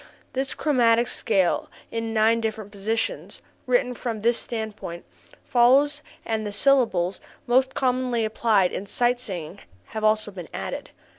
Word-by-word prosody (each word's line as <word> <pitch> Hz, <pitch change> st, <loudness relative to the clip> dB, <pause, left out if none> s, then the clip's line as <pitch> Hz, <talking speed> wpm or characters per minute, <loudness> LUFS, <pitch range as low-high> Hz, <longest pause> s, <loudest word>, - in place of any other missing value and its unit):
The 265 Hz, +2 st, -1 dB
chromatic 240 Hz, -5 st, +3 dB
scale 195 Hz, -7 st, +1 dB, 0.2 s
in 225 Hz, 0 st, -3 dB
nine 225 Hz, +1 st, +3 dB
different 215 Hz, -2 st, -4 dB
positions, 215 Hz, +3 st, -3 dB, 0.3 s
written 250 Hz, 0 st, +2 dB
from 230 Hz, -3 st, -4 dB
this 235 Hz, +2 st, +2 dB
standpoint, 220 Hz, -7 st, -5 dB, 0.4 s
follows, 275 Hz, +5 st, +4 dB, 0.2 s
and 220 Hz, -1 st, -1 dB
the 205 Hz, -, -4 dB
syllables 200 Hz, -6 st, +2 dB, 0.2 s
most 260 Hz, +2 st, +2 dB
commonly 250 Hz, -3 st, +1 dB
applied 215 Hz, -4 st, +2 dB
in 200 Hz, -, -5 dB
sight 245 Hz, +3 st, +1 dB
singing 180 Hz, -10 st, -4 dB, 0.3 s
have 220 Hz, -, -5 dB
also 215 Hz, -1 st, +2 dB
been 180 Hz, -4 st, -9 dB
added. 95 Hz, +1 st, -5 dB
225 Hz, 135 wpm, -24 LUFS, 205-245 Hz, 0.4 s, follows